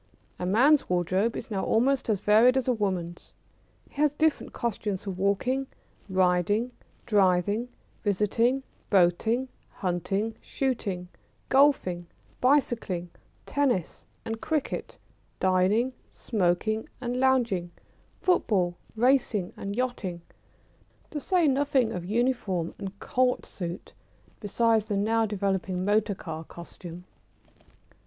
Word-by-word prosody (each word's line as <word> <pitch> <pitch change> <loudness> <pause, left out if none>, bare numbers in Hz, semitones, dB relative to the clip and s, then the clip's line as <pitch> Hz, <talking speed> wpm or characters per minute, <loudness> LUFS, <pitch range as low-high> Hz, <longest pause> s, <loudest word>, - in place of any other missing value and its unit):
A 180 - -2
man's 265 +10 +4
wardrobe 185 +5 +1
is - - -7
now 195 -2 -1
almost 255 +3 +2
as 205 -4 +1
varied 230 +5 +5
as 265 - 0
a 250 - +4
woman's. 185 -6 -3 0.5
He 285 - -5
has 295 -1 +3
different 315 0 +1
costumes 210 -5 -3
for 200 - -3
walking, 200 +8 0 0.4
riding, 185 +5 +2 0.3
driving, 205 +2 +2 0.3
visiting, 230 +6 +1 0.3
boating, 205 +7 +3 0.2
hunting, 195 +5 -2
shooting, 205 -9 -2 0.4
golfing, 265 -11 +3 0.3
bicycling, 235 -10 +1 0.3
tennis, 260 - -1 0.2
and 225 0 -4
cricket, 310 -3 -2 0.4
dining, 190 +7 +2 0.2
smoking, 215 +1 -1
and 250 0 -2
lounging, 240 -9 +2 0.5
football, 195 - +2 0.2
racing, 235 -5 +2
and 200 +1 -5
yachting, 215 -9 -3 0.9
to 300 - -3
say 350 +1 +2
nothing 270 -4 +2
of 180 - -4
uniform 210 -6 0
and 195 0 -7
Court 255 0 +1
suit, 175 -1 -6 0.5
besides 220 +1 +1
the 205 -2 -1
now 225 +2 +2
developing 190 -2 -1
motor 205 0 +2
car 160 -3 -6
costume. 170 +1 -10
210 Hz, 110 wpm, -27 LUFS, 185-250 Hz, 0.9 s, varied